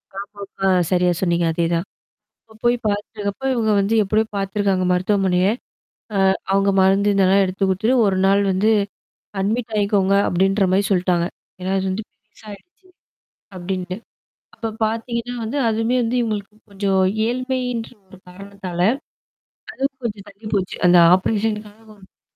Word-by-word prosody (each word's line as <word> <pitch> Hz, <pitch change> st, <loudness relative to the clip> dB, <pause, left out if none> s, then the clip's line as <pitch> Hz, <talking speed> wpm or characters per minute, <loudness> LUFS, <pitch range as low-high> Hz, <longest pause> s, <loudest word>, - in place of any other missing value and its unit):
Lockdown 200 Hz, 0 st, -8 dB
அ -, -, +4 dB, 0.2 s
சரியா 180 Hz, -1 st, +3 dB
சொன்னீங்க. 170 Hz, -2 st, +1 dB
அதே 170 Hz, +1 st, 0 dB
தான். 170 Hz, +2 st, -1 dB, 0.6 s
இப்போ 220 Hz, -, -21 dB
போய் 240 Hz, 0 st, +4 dB
பார்த்துட்டுருக்கப்ப 205 Hz, +3 st, -3 dB
இவங்க 225 Hz, -3 st, +1 dB
வந்து 200 Hz, +3 st, +1 dB
எப்படியோ 215 Hz, +3 st, +1 dB
பார்த்துருக்காங்க 195 Hz, -1 st, 0 dB
மருத்துவமனைய, 185 Hz, 0 st, +2 dB, 0.7 s
அ, -, -, +1 dB, 0.3 s
அவங்க 195 Hz, 0 st, +3 dB
மருந்து 195 Hz, +2 st, +3 dB
இதெல்லாம் 195 Hz, 0 st, +4 dB
எடுத்துக்குடுத்துத்துட்டு 195 Hz, +6 st, +1 dB
ஒரு 195 Hz, -2 st, +1 dB
நாள் 195 Hz, +1 st, +4 dB
வந்து 200 Hz, +4 st, +2 dB, 0.7 s
அட்மிட் 220 Hz, +4 st, -1 dB
ஆகிக்கோங்க 200 Hz, -1 st, +2 dB
அப்படின்ற 195 Hz, +2 st, +2 dB
மாரி 195 Hz, +2 st, +3 dB
சொல்லிட்டாங்க. 180 Hz, -2 st, +1 dB, 0.3 s
ஏன்னா 185 Hz, +1 st, -2 dB
அது 190 Hz, -, -2 dB
வந்து 200 Hz, +4 st, -3 dB
பெருசாயிடுச்சு. 215 Hz, -, -16 dB, 0.7 s
அப்படின்னுட்டு. 185 Hz, 0 st, -4 dB, 0.6 s
அப்ப 225 Hz, -, -4 dB, 0.2 s
பார்த்திங்கன்னா 235 Hz, +2 st, -3 dB
வந்து, 240 Hz, +6 st, -3 dB
அதுவுமே 225 Hz, +3 st, 0 dB
வந்து 235 Hz, +2 st, -1 dB
இவங்களுக்கு 210 Hz, -2 st, -4 dB, 0.2 s
கொஞ்சம் 195 Hz, -1 st, 0 dB, 0.3 s
ஏழ்மைன்ற 250 Hz, -1 st, -2 dB, 0.2 s
ஒரு 190 Hz, -, -14 dB
காரணத்தால 190 Hz, -1 st, -8 dB, 0.9 s
அதுவும் 270 Hz, 0 st, -3 dB
கொஞ்சம் 205 Hz, -3 st, -4 dB
தள்ளி 200 Hz, +3 st, -18 dB
போச்சு. 185 Hz, -2 st, -2 dB
அந்த 175 Hz, 0 st, +7 dB, 0.2 s
ஆப்ரேஷனுக்காக 210 Hz, 0 st, -4 dB
200 Hz, 130 wpm, -21 LUFS, 190-220 Hz, 0.9 s, அந்த